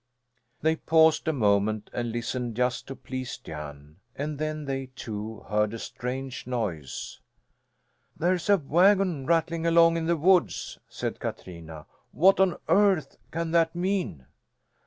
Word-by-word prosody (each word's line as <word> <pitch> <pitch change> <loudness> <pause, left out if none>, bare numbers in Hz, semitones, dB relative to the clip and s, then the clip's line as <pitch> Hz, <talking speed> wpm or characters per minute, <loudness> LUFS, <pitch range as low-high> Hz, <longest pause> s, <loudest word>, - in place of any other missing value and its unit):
They 160 +1 +2
paused 160 0 +4
a - - +4
moment 105 -4 +1
and 120 -1 -2
listened, 120 0 -3
just 125 +1 -1
to 135 - -6
please 130 -1 -6
Jan. 75 -1 -9 0.2
And 145 +1 -4
then 155 -1 -3
they, 135 -1 -3
too, 110 0 -6
heard 105 +1 +1
a - - -4
strange 125 +2 -5
noise. 100 - -4 1.0
"There's 175 +2 0
a 200 - +6
wagon 175 -1 +3
rattling 165 0 +1
along 165 0 +5
in 165 -1 -2
the 170 0 +2
woods," 180 +3 +2
said - - -4
Katrina. 80 -4 -7 0.3
"What 190 +4 +5
on 190 -2 +3
earth 195 -5 +3
can 165 0 -3
that 165 0 +2
mean?" 180 - -2
140 Hz, 135 wpm, -27 LUFS, 110-170 Hz, 1.0 s, a